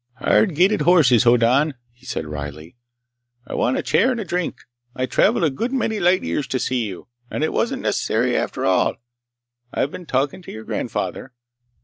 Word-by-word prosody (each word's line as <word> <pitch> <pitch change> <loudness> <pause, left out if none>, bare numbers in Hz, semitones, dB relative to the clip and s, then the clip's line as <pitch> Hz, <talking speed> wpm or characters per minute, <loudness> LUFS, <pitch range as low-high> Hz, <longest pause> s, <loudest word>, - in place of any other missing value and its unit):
"Hard 180 - +2
gaited 185 +2 +3
horses, 145 -8 +5
Hoddan," 125 +5 +4 0.2
he 120 - -19
said 80 - -3
wryly. 75 +3 -7 0.7
"I - - -8
want 125 - +1
a - - -2
chair 235 - +3
and 250 -3 -1
a 215 - -4
drink. 180 -1 -3 0.3
I 130 - -1
traveled 185 - +2
a 155 - +3
good 230 - -3
many 225 -5 -1
light 180 +2 +3
years 85 - -2
to 130 - -1
see 125 -4 -1
you, 95 -3 -9 0.2
and - - -3
it 155 - 0
wasn't - - -1
necessary - - 0
after - - -2
all. - - +2 0.8
I've 140 - -1
been 180 -2 -9
talking 135 +6 -1
to - - -10
your 110 - -8
grandfather." 130 +3 -4
135 Hz, 180 wpm, -21 LUFS, 120-180 Hz, 0.8 s, horses